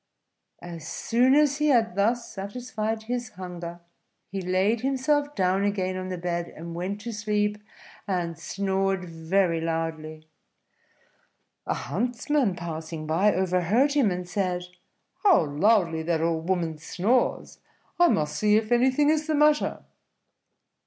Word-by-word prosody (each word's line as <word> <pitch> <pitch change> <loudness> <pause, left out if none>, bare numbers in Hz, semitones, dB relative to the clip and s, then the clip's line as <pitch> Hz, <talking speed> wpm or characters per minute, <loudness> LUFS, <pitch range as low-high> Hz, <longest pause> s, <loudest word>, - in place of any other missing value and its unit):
As 165 -3 -8
soon 250 +9 +2
as 295 -2 +4
he 300 - +2
had 235 -8 +3
thus 230 +5 +1
satisfied 220 +2 -4
his 245 +1 -3
hunger, 175 -2 -7 0.5
he 195 0 -3
laid 190 +5 +1
himself 285 +2 0
down 190 +1 +1
again 190 -2 -1
on 185 0 -4
the 185 - -3
bed, 175 0 -2
and 170 +1 -7
went 190 +4 -4
to 235 +1 -5
sleep 210 0 -1 0.5
and 175 -4 -1
snored 195 +1 -1
very 165 +1 0
loudly. 160 -1 -4 1.4
A - - 0
huntsman 245 - -1
passing 160 -2 -6
by 170 +7 +3
overheard 190 - +2
him, 275 -8 +3
and 180 -1 -4
said, 180 -1 -1 0.6
"How 380 - +5
loudly 165 +2 +2
that 165 0 0
old 165 +1 -1
woman 165 -4 -1
snores! 210 +11 0 0.4
I 350 - +7
must 150 - 0
see 210 +5 +3
if 220 +1 -2
anything 260 +5 +4
is 310 0 0
the 310 - +1
matter." 300 0 +2
195 Hz, 135 wpm, -26 LUFS, 170-235 Hz, 1.4 s, I